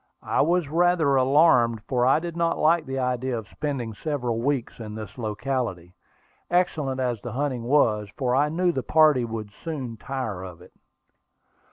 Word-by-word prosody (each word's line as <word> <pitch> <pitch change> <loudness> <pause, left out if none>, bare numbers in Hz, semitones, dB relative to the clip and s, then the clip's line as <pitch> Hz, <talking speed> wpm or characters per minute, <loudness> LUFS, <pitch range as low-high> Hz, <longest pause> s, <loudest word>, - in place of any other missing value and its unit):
I - - +1
was 170 +1 +2
rather 165 -2 +2
alarmed, 130 -5 +4
for 125 -1 +1
I 135 - +5
did 170 0 -6
not 170 0 0
like 160 0 +2
the 135 0 -3
idea 125 -1 -1
of 110 -2 -7
spending 130 -5 -4
several 125 -2 -2
weeks 135 -2 -2
in 110 -2 -7
this 110 -1 -8
locality, 110 -6 -3 0.6
excellent 155 -7 0
as 120 -4 -1
the 120 -2 -6
hunting 130 -3 -2
was, 110 -6 +2
for 125 -3 0
I 145 +2 +3
knew 175 +3 +1
that - - -10
the 130 - -1
party 150 -4 +4
would 110 -2 -6
soon 135 -8 -5
tire 110 -8 -4
of 90 -3 -9
it. - - -17
130 Hz, 175 wpm, -25 LUFS, 115-150 Hz, 0.6 s, I